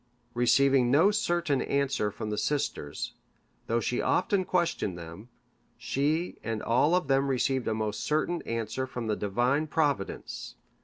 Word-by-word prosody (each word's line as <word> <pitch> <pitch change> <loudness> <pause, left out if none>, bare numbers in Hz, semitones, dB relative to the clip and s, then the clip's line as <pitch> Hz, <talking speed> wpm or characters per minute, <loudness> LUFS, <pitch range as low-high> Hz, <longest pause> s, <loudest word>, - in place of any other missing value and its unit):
Receiving 125 +1 +4
no 160 +10 +5
certain 175 -8 0
answer 140 -6 0
from 105 +1 -5
the 105 - -2
sisters, 140 - -2 0.5
though 115 +1 +1
she 120 - -1
often 195 -2 +1
questioned 170 - 0
them, 85 +7 -10 0.5
she 155 +6 -1
and 110 -1 -3
all 145 +9 +3
of 180 -5 0
them 135 0 +2
received 130 -1 0
a 110 - +1
most 110 -1 -2
certain 160 +3 0
answer 115 +3 -3
from 125 -2 -5
the 110 -1 0
Divine 125 +10 0
Providence. 140 - -2
130 Hz, 145 wpm, -28 LUFS, 110-150 Hz, 0.5 s, no